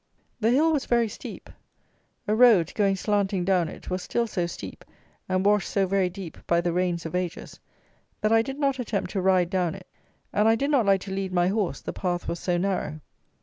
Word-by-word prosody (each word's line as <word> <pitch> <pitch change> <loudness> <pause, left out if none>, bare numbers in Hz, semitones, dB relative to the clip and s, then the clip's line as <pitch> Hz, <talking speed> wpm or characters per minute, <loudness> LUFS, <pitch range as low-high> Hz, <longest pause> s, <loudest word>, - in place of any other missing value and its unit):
The 225 0 +2
hill 310 +6 +3
was 290 - -1
very 235 -1 +3
steep. 210 - -9 0.8
A 210 - +2
road, 220 -8 +5
going 200 -2 +2
slanting 195 -2 0
down 180 -3 +2
it, - - -10
was 185 0 -1
still 235 +5 -1
so 180 -6 -2
steep, 170 - -8 0.5
and 185 +1 0
washed 210 0 +3
so 195 -1 +1
very 190 -1 +1
deep, 180 -2 -9
by 170 - +3
the 170 0 -1
rains 175 -1 -1
of 160 - -5
ages, 180 -1 -4 0.6
that 215 - +1
I 225 - +6
did 270 +4 -5
not 275 -2 0
attempt 215 -5 -2
to 195 - -1
ride 185 -2 +3
down 180 -3 0
it, 190 -2 -11 0.5
and 210 +2 +3
I 225 - +5
did 280 +5 -1
not 250 -8 +3
like 195 -1 +4
to 195 - -7
lead 190 -1 -3
my 175 0 +2
horse, 195 -8 -1
the - - -5
path 175 -2 -2
was 170 - -3
so 175 -1 0
narrow. 180 -4 -2
195 Hz, 215 wpm, -26 LUFS, 180-220 Hz, 0.8 s, I